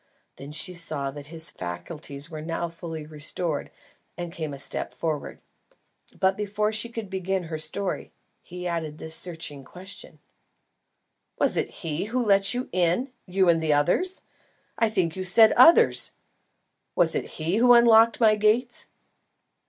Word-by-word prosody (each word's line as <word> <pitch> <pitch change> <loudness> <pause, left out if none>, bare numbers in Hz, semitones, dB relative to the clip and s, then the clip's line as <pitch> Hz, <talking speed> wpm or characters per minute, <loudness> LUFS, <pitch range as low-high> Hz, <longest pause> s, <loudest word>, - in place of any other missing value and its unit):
Then 140 +2 -9
she 155 +5 -1
saw 155 -5 -3
that 145 0 -10
his 160 +1 -4
faculties 140 - -7
were 155 -2 -7
now 165 +2 -3
fully 165 -2 -7
restored, 155 +1 -3 0.5
and 175 -1 -6
came 160 -4 -4
a 140 - -7
step 135 - -3
forward. 155 -3 -4 0.8
But 190 0 +3
before 210 +1 -1
she 220 +2 +1
could 225 -3 -6
begin 190 0 -2
her 160 -2 -5
story, 180 +6 -4 0.3
he 180 0 -7
added 160 -3 -3
this 160 0 -2
searching 160 -5 -3
question: 185 +7 -10 1.2
"Was - - +2
it - - 0
he 165 0 -4
who 245 +3 -1
let 195 -1 +5
you 250 +1 -2
in 185 +9 0
you 185 0 +2
and 165 -1 +3
others 165 - +1 0.5
I 225 - +2
think 175 -6 0
you 190 - -4
said 215 +5 +6
others? 330 +8 +6 0.8
Was 170 -2 +3
it - - -4
he 165 +5 0
who 245 +1 +6
unlocked 230 -1 +6
my 220 -2 +5
gates?" 220 +4 0
175 Hz, 150 wpm, -25 LUFS, 155-210 Hz, 1.2 s, said